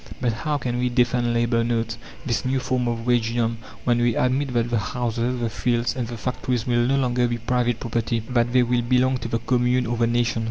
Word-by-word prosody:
But 120 -2 0
how 150 +6 -1
can 120 -3 -2
we 125 0 +1
defend 120 -1 +2
labour 115 0 +1
notes, 115 -1 -1 0.3
this 120 -4 0
new 130 +1 0
form 125 -1 -1
of 115 -1 -2
wagedom, 115 -1 +1 0.3
when 120 -1 +2
we 120 -1 +2
admit 130 +2 +1
that 120 0 +1
the 115 - +2
houses, 120 +2 -2
the 120 - 0
fields, 120 +1 0
and 125 -3 -2
the 120 0 -6
factories 125 0 -2
will 120 -1 +2
no 135 - +2
longer 125 -2 +1
be 120 0 -2
private 120 0 0
property, 115 0 -1
that 120 -1 +2
they 125 0 +4
will 120 0 +1
belong 125 +2 +2
to 115 - -5
the 115 - 0
commune 125 +1 +1
or 120 +1 -2
the 115 0 +2
nation? 120 0 +1
120 Hz, 225 wpm, -23 LUFS, 115-125 Hz, 0.3 s, they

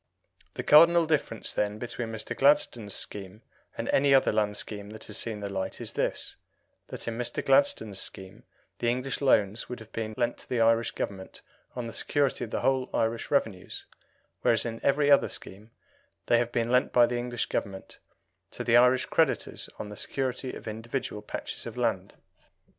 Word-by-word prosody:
The - - -4
cardinal 170 +2 +7
difference, 150 -8 -1
then, 105 0 -1
between 120 0 -4
Mr. 110 -1 -4
Gladstone's 120 -7 +2
scheme 100 +2 -6 0.3
and - - -3
any 140 0 +4
other 135 - +4
land 105 -1 0
scheme 100 -1 -5
that 110 +1 -9
has 105 - -5
seen 110 -3 -3
the 100 - -3
light 95 -1 -3
is - - -3
this - - -2 0.5
that - - -7
in 115 0 -3
Mr. 120 - -2
Gladstone's 280 - +3
scheme 95 0 -7 0.4
the 120 - +1
English 130 +4 -2
loans 110 -6 +2
would 125 - -5
have 110 0 -13
been 110 -1 -4
lent 120 -1 0
to - - -11
the 125 - 0
Irish 115 0 +3
Government 95 -2 -6 0.3
on 125 -2 -4
the 115 - -6
security 140 -3 0
of - - -11
the - - -2
whole 130 -1 +1
Irish 115 +1 0
revenues, 110 -10 -1 0.6
whereas 115 -1 +2
in 115 -1 -5
every 145 +1 +3
other 140 - +5
scheme 105 +4 -7 0.6
they 120 - +4
have 120 0 -1
been 120 0 0
lent 125 0 +3
by 120 -1 +6
the 120 0 -2
English 120 -1 -2
Government 95 -3 -5 0.5
to - - -6
the 120 0 +5
Irish 125 +1 +5
creditors - - 0
on 105 - -6
the 105 - -8
security 130 +2 -2
of - - -10
individual 115 0 -4
patches 105 - -5
of - - -8
land. - - -1
115 Hz, 180 wpm, -28 LUFS, 105-130 Hz, 0.6 s, cardinal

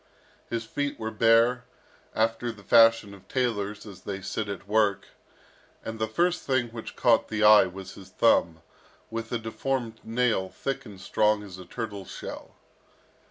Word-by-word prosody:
His 115 -1 -2
feet 145 +4 -3
were 110 0 -3
bare, 115 +3 +4 0.5
after 115 +2 0
the 105 -3 -15
fashion 115 -1 +5
of 100 - -15
tailors 105 -5 -2
as 100 -3 -11
they 100 -1 -5
sit 100 +2 -4
at 100 0 -6
work; 105 -2 +1 0.8
and 110 0 -5
the 110 - 0
first 175 +10 +1
thing 130 -3 0
which 115 -1 -8
caught 115 -2 +3
the 110 0 -1
eye 105 -2 +8
was 95 +1 -9
his 95 -1 -13
thumb, 80 -1 +2 0.5
with 115 0 -5
a 120 - 0
deformed 115 +1 -3
nail 115 -5 0
thick 135 +2 -4
and 100 -3 -11
strong 105 +2 +1
as 95 -2 -10
a 90 - -10
turtle's 100 +1 -6
shell. - - -8
110 Hz, 160 wpm, -27 LUFS, 100-115 Hz, 0.8 s, eye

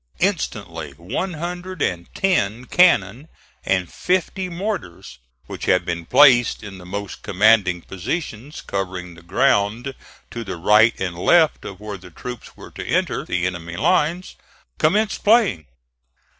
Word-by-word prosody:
Instantly 100 - -2
one 135 - -3
hundred 175 +3 -6
and 85 -9 -2
ten 125 - 0
cannon 135 - +3 0.4
and 95 -3 -1
fifty 185 +1 -1
mortars, 170 - -5 0.3
which - - -7
had - - +2
been 85 -1 -4
placed 125 -4 +5
in 100 -2 -9
the 90 - -12
most 100 +1 -6
commanding 100 -3 +3
positions 125 - -5
covering 95 -3 -4
the 85 - -15
ground 105 +6 +1 0.4
to 115 - -5
the 95 - -6
right 105 +6 +4
and 90 -2 -3
left 160 - +3
of 95 - -8
where 105 -2 -7
the 90 0 -13
troops 125 +7 -9
were - - -12
to - - -8
enter - - 0
the 90 0 -2
enemy's 85 -2 -4
lines, 175 +3 +1 0.4
commenced 210 +7 +1
playing. 205 - +3
105 Hz, 140 wpm, -21 LUFS, -, 0.4 s, placed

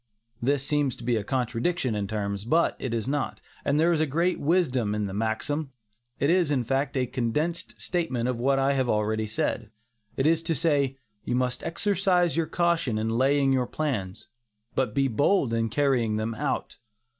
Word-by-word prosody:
This 135 +2 +1
seems 145 -3 +1
to - - -12
be 120 0 +1
a 110 - -1
contradiction 125 - -1
in 105 -2 -2
terms, 100 -1 -3
but 160 +9 +2
it 130 - -3
is 115 0 -2
not, 145 0 -2 0.2
and 140 +2 +1
there 165 +2 +4
is 155 -1 +2
great 170 +6 +1
wisdom 130 - +1
in 105 -1 -1
the 95 - -5
maxim. 125 +7 -2 0.5
It 140 - +3
is, 175 -3 +3
in 135 -4 +1
fact, 135 +3 -1
a 130 - +2
condensed 130 +7 -2
statement 150 -10 -1
of 125 -2 -1
what 135 +2 +2
I 135 +1 +2
have 130 -3 0
already 110 +1 0
said. 110 +1 -2 0.5
It 135 - +1
is 165 +1 +3
to 165 0 -1
say, 140 -3 +1 0.3
"you 125 - -1
must 125 0 0
exercise 180 -1 +1
your 165 -1 +1
caution 170 -9 +1
in 110 +1 -1
laying 135 +3 +3
your 125 -2 +1
plans, 110 -14 -3 0.5
but 125 -5 -1
be 135 -1 +3
bold 135 - +2
in 115 0 +1
carrying 125 -4 +1
them 110 +1 -2
out." - - -3
135 Hz, 185 wpm, -26 LUFS, 115-155 Hz, 0.5 s, there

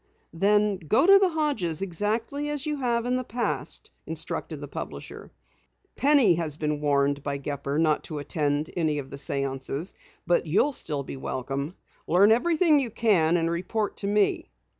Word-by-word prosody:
"Then 205 +3 +2
go 185 - +2
to 395 +1 +8
the 385 -2 +3
Hodges' 275 - -1
exactly 220 - -2
as 295 -1 -3
you 300 -1 -2
have 240 -3 0
in 250 +1 +1
the 255 - -2
past," 240 0 -3 0.2
instructed - - -3
the - - -7
publisher. - - -8 0.6
"Penny 275 -9 +4
has 160 -3 -2
been 150 -1 -2
warned 140 -1 +1
by 140 0 -3
Gepper 140 0 -3
not 155 -2 +2
to 155 - -6
attend 145 +1 -1
any 155 -3 0
of 135 -2 -6
the 140 - -6
séances, 140 +4 -2 0.3
but 175 -1 +1
you'll 205 - +2
still 150 - -2
be 135 - -7
welcome. 135 +5 -4 0.3
Learn 195 +6 +5
everything 315 +5 +4
you 260 -4 -1
can 185 -8 +2
and 165 0 0
report 205 +5 -2
to 200 - -2
me." 205 - +1
175 Hz, 165 wpm, -26 LUFS, 145-235 Hz, 0.6 s, to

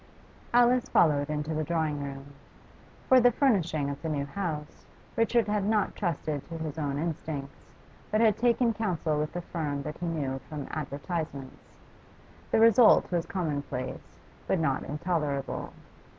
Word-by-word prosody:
Alice 245 +1 +4
followed 145 -3 +3
into 150 +1 -2
the 155 0 -1
drawing 155 -3 -1
room. 140 0 -7 0.7
For 260 - +7
the 245 0 +6
furnishing 180 - +1
of 140 0 -5
the 160 - -3
new 145 -2 -1
house 150 -1 -5 0.3
Richard 230 0 +2
had 210 -1 0
not 210 0 +1
trusted 155 -6 -2
to 165 - -6
his 160 -1 -5
own 140 -2 -1
instincts, 155 -3 -5 0.4
but 215 - +1
had 220 -3 +5
taken 240 0 +2
counsel 170 -8 -1
with 150 +2 -3
a 175 - -2
firm 145 -5 -3
that 150 - -6
he 175 - -3
knew 140 -5 -2
from 150 -3 -5
advertisements. 145 -1 -5 0.7
The - - +3
result 225 -2 +6
was 170 -1 0
commonplace, 145 -7 -4 0.3
but - - +2
not 140 -5 +1
intolerable. 150 -3 -2
160 Hz, 150 wpm, -28 LUFS, 145-195 Hz, 0.7 s, For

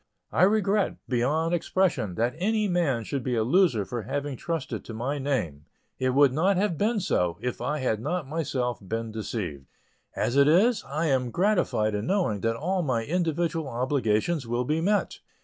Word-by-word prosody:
I - - +1
regret, 205 0 +1
beyond 145 +7 +1
expression, 170 - 0
that 120 +5 0
any 215 +3 +1
man 165 - +1
should 140 +3 -3
be 125 0 -1
a 110 - +2
loser 130 - +3
for 120 +4 -4
having 140 +6 -3
trusted 165 +2 -4
to 115 - -7
my 135 +6 -2
name; 90 - -2 0.3
it 130 0 0
would 140 -2 +5
not 180 +6 +2
have 195 -3 +1
been 215 +6 +1
so, 90 - 0
if 125 -1 -4
I 145 +5 -1
had 125 -6 0
not 175 +2 -2
myself 130 -6 -2
been 115 +3 -4
deceived. 95 - -5 0.5
As 120 - -1
it 140 0 +6
is, 205 +10 +4
I 150 +4 -2
am 130 -5 +1
gratified 175 - +1
in 105 +2 -2
knowing 180 - 0
that 115 0 0
all 180 +9 -1
my 125 -8 0
individual 165 -1 -1
obligations 130 +2 0
will 120 +1 -1
be 155 +4 0
met. 205 +4 0
140 Hz, 180 wpm, -26 LUFS, 115-175 Hz, 0.5 s, it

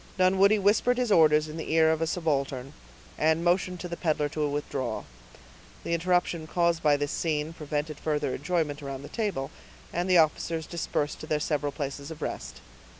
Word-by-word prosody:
Dunwoodie 190 +3 +5
whispered 210 +5 +3
his 250 -3 0
orders 155 -3 +5
in 155 +1 -7
the 160 - -5
ear 160 -1 +5
of 160 0 -1
a 165 - +1
subaltern, 140 -5 -1 0.5
and 160 +2 +2
motioned 180 +1 +1
to 180 - -4
the 170 - -5
peddler 155 -4 0
to 150 0 -1
withdraw. 145 -2 -3 0.8
The 170 - -2
interruption 170 -1 +1
caused 170 0 +1
by 150 -1 +4
this 145 0 -2
scene 155 -1 -1
prevented 150 -1 -4
further 150 -4 -1
enjoyment 150 -1 -1
around 135 -1 -6
the - - -9
table, 200 - -2 0.4
and 175 +2 -1
the 180 - +6
officers 160 0 +2
dispersed 150 -3 -2
to 155 - -8
their 155 -1 +1
several 145 -1 -1
places 140 0 -5
of 160 - -7
rest. - - -5
160 Hz, 180 wpm, -28 LUFS, 145-175 Hz, 0.8 s, the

